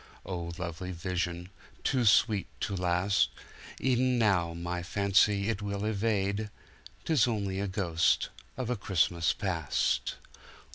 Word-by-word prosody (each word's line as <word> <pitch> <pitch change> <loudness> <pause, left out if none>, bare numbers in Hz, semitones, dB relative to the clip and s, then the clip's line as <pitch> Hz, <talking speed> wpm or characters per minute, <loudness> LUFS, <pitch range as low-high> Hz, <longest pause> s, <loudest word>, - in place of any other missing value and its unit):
Oh, 85 -2 -4
lovely 90 0 -5
vision, 90 0 -3 0.3
too 125 -3 +1
sweet 105 -1 +4
to 100 - -1
last—E'en 100 +7 0
now 90 -7 +2
my 85 +1 -3
fancy 100 +2 +2
it 110 -3 -1
will 100 0 -3
evade— 105 -1 0 0.6
'Tis 155 -5 +3
only 100 -4 -1
a 100 - -1
ghost 85 -4 +1 0.3
of 125 -2 -2
a - - +1
Christmas 85 -4 +1
Past. 90 -7 -1
100 Hz, 115 wpm, -30 LUFS, 90-105 Hz, 0.6 s, sweet